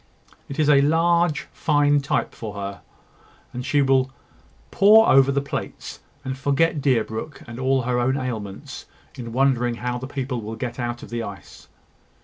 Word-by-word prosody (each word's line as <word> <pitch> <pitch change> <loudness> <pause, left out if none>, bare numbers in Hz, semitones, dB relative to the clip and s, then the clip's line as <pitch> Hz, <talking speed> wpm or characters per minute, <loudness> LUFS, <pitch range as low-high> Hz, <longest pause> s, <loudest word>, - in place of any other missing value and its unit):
It 140 - -6
is 155 -2 +2
a 140 -2 +6
fine 140 - +3
large 170 -1 +2 0.5
type 140 - -1
for 105 -2 -7
her; 100 -1 -6 0.7
and 125 - -5
she 140 +2 +2
will 135 -1 +2 0.6
pore 220 +3 +6
over 135 0 +5
the 140 0 0
plates, 140 - -6 0.3
and 130 0 -3
forget 145 +3 +1
Deerbrook 125 +1 -1
and 120 +1 -8
all 130 0 +1
her 125 0 0
own 130 +3 +1
ailments, 110 -7 -6 0.3
in 115 -2 -8
wondering 125 -1 +1
how 125 +1 -3
the 130 - -6
people 130 -3 -4
will 110 +1 -6
get 120 +2 -5
out 120 0 -4
of - - -11
the 120 0 -2
ice." 100 -3 -10
130 Hz, 165 wpm, -23 LUFS, 120-140 Hz, 0.7 s, a